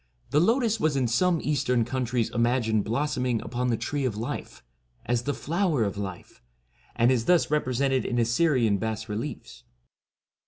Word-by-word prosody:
The 145 - +4
lotus 225 - +2
was 155 -5 +1
in 130 -3 +1
some 170 +8 +2
Eastern 130 -5 +1
countries 120 -2 -1
imagined 115 -3 +1
blossoming 125 0 -1
upon 125 0 -2
the 115 -2 +1
Tree 145 +4 -3
of 120 -5 -1
Life, 115 +3 -5 0.4
as 120 0 -1
the 145 - 0
Flower 165 - 0
of 100 - -2
Life, 95 -3 -7 0.5
and 120 +2 +4
is 120 -3 +1
thus 175 -4 +3
represented 135 -2 +1
in 120 - -2
Assyrian 115 -3 +2
bas 110 +1 -3
reliefs. 110 +7 -6
125 Hz, 155 wpm, -26 LUFS, 115-145 Hz, 0.5 s, The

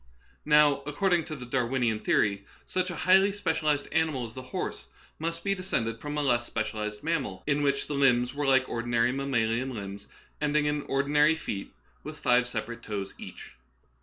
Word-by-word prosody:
Now 150 -2 +5
according 175 +2 +1
to 155 - -5
the 125 -4 -8
Darwinian 120 -3 0
theory, 100 -2 +1 0.2
such 185 0 -1
a 175 - -4
highly 190 +4 +4
specialized 155 -7 0
animal 155 -5 +1
as 115 - -10
the 130 - -7
horse 130 - -5 0.3
must 165 +1 -3
be 195 - +1
descended 115 - -2
from 150 0 -4
a 150 - +1
less 120 -3 +2
specialized 110 -1 -4
mammal 140 - -2
in 145 0 +1
which 140 -1 +1
the 150 - -4
limbs 125 -3 +3
were 145 0 -2
like 130 -1 +4
ordinary 120 0 +1
mammalian 130 -2 0
limbs, 100 -1 -7 0.3
ending 150 0 +2
in 150 0 0
ordinary 145 +3 +3
feet 100 -10 -5 0.3
with 155 0 -7
five 125 -3 +3
separate 120 0 -4
toes 100 -3 -5
each. - - -10
135 Hz, 170 wpm, -28 LUFS, 120-150 Hz, 0.3 s, Now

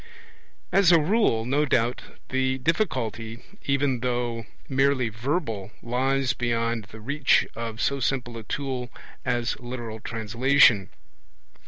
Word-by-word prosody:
As 195 -3 +5
a 170 - +7
rule, 155 - +2
no 140 +4 +2
doubt, 120 -3 +1 0.3
the 130 0 +1
difficulty, 125 - -1 0.2
even 140 -2 +1
though 120 -3 -2 0.2
merely 135 -2 +2
verbal, 115 - -2
lies 130 +1 +1
beyond 115 -2 -1
the 110 +2 -12
reach 140 +5 +2
of 115 -1 -5
so 140 +2 +1
simple 125 -2 -1
a 115 - -6
tool 130 +1 -3 0.3
as 120 -1 -1
literal 120 -3 -6
translation. 115 0 +3
125 Hz, 120 wpm, -26 LUFS, 115-135 Hz, 0.3 s, a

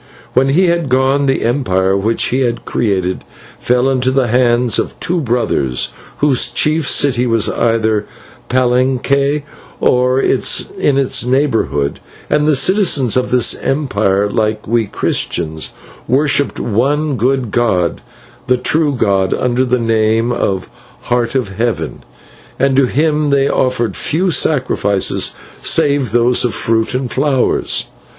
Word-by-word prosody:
"When 135 +2 +2
he 175 +7 +3
had 170 -4 0
gone, 135 +2 +2
the 135 - 0
empire 95 -7 +1
which 110 +4 0
he 125 -1 +1
created 95 -5 -1 0.4
fell 125 +1 +1
into 130 -1 +1
the 130 0 +1
hands 120 0 +2
of - - -4
two 175 0 0
brothers, 115 - -1 0.3
whose 140 -4 +2
chief 155 +4 +1
city 125 -3 +2
was 115 -2 +1
either 110 -2 +1 0.4
at - - -30
Palenque 130 +3 +1 0.4
or 125 +1 +2
in 140 +1 0
its 135 -3 +1
neighbourhood, 125 - 0 0.3
and 150 0 +2
the 155 - +3
citizens 150 - +2
of 125 - 0
this 125 -1 +2
empire, 105 -8 0
like 110 0 -2
we 115 -1 0
Christians, 80 -4 -3 0.4
worshipped 140 +2 +1
one 140 +7 0
good 125 -1 0
god, 95 -9 0 0.5
the 125 0 +2
true 150 +2 0
God, 95 -5 +1
under 125 0 0
the 125 0 +1
name 115 0 +1
of 95 -5 -1
the 125 0 -25
Heart 120 0 0
of 125 -7 0
Heaven, 110 -10 -2 0.5
and 135 -1 +1
to 135 -1 +3
Him 150 +2 0
they 140 -1 +2
offered 125 -4 0
few 180 +4 0
sacrifices 125 - +1 0.3
save 140 -4 +1
those 120 +1 +2
of 125 - -1
fruit 115 +1 -1
and 125 -2 -3
flowers. 135 0 0
125 Hz, 135 wpm, -15 LUFS, 115-135 Hz, 0.5 s, he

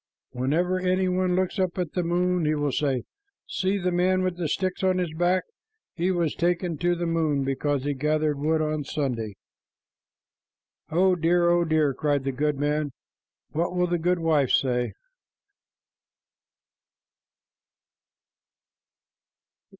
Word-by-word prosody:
Whenever 160 +9 0
any 185 +1 +1
one 180 0 +1
looks 185 +2 -1
up 185 -1 0
at 175 -4 -2
the 180 - 0
moon, 175 +1 +1
he 155 0 +1
will 145 -1 0
say, 135 -2 0 0.4
'See 190 +2 0
the 180 -1 -1
man 185 +1 +2
with 185 -1 -1
the 175 -2 -2
sticks 185 +3 -1
on 185 -1 +3
his 175 -4 -2
back. 175 +3 +1 0.5
He 175 +1 0
was 170 -4 0
taken 170 -2 -1
to 175 0 +2
the 175 0 -3
moon 160 -4 +1
because 135 +1 -1
he 145 0 -1
gathered 150 +1 0
wood 155 +2 +1
on 155 -1 -1
Sunday.'" 120 -8 -3 1.5
"Oh 185 +3 +3
dear, 170 +1 +3
oh 175 0 +3
dear," 155 -3 +2
cried 145 0 0
the 135 - -1
goodman, 145 +1 -1 0.6
"what 170 +3 -1
will 180 0 +2
the 175 -1 -1
goodwife 165 -5 +2
say?" 125 -2 +1
165 Hz, 135 wpm, -25 LUFS, 145-180 Hz, 1.5 s, on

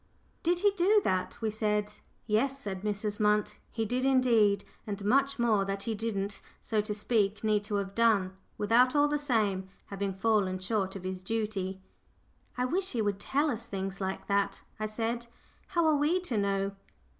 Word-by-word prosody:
"Did 345 +1 +1
he 410 0 +5
do 400 +2 +4
that?" 185 -1 -1
we 220 -1 0
said. 210 -1 0 0.3
"Yes," 255 +6 +1
said 195 -7 -5
Mrs. 210 0 -2
Munt, 210 0 +2
"he 225 -1 -1
did 250 +4 -1
indeed; 230 -7 +4 0.2
and 200 -1 -4
much 275 +5 +3
more 225 -5 +3
that 195 0 -3
he 230 - -2
didn't, 205 -2 -3 0.2
so 220 -2 0
to 210 0 -3
speak, 210 -1 0
need 210 -1 +2
to 210 -1 -2
have 195 -1 -2
done 200 -4 +2 0.2
without, 240 +6 +4
all 290 0 +5
the 295 0 0
same, 210 -9 0 0.2
having 195 -1 -2
fallen 195 -2 +1
short 190 0 -1
of 195 - -7
his 185 0 -5
duty." 195 -3 -2 0.8
"I 250 - +1
wish 375 +8 0
he 235 - 0
would 200 -1 -1
tell 290 +6 +1
us 225 - -5
things 195 0 -4
like 190 0 -3
that," 200 0 0 0.2
I 215 - -1
said. 230 +2 -2 0.4
"How 340 -1 +1
are 310 -1 +4
we 305 +6 +2
to 310 -10 -3
know?" 195 -1 0
210 Hz, 180 wpm, -30 LUFS, 200-245 Hz, 0.8 s, he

